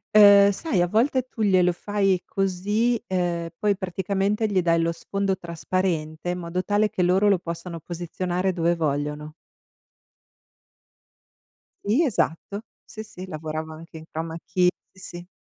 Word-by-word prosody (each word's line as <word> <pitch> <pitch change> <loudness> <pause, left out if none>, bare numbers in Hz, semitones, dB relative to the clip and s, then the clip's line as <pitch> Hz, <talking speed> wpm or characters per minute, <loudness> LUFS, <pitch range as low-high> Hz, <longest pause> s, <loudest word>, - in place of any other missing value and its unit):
Ehm, 200 -1 +8
sai, 205 - -1
a 175 - +1
volte 250 +6 +2
tu 235 - -8
glielo 185 -4 +4
fai 195 0 0
così, 205 +5 0
uhm, 175 -2 -1
poi 205 +1 +1
praticamente 195 +3 -1
gli 195 -3 +1
dai 170 -1 +2
lo 165 0 +1
sfondo 195 +3 -2
trasparente 170 -2 -2
in 180 - -1
modo 175 +1 -3
tale 210 +2 +1
che 185 - -2
loro 185 +4 +4
lo 195 -3 +3
possano 170 0 -6
posizionare 175 +3 -2
dove 170 0 +1
vogliono. 150 -1 -2 2.5
Sì, 240 +12 +3
esatto. 200 - -1 0.2
Sì, 220 - -8
sì, 190 -3 -10
lavorava 155 -1 -5
anche 165 +1 -11
in 160 - -11
chroma 165 +1 -5
key. 180 -1 +3 0.2
Sì, 190 - -20
sì. 175 -2 -9
180 Hz, 145 wpm, -24 LUFS, 170-200 Hz, 2.5 s, Ehm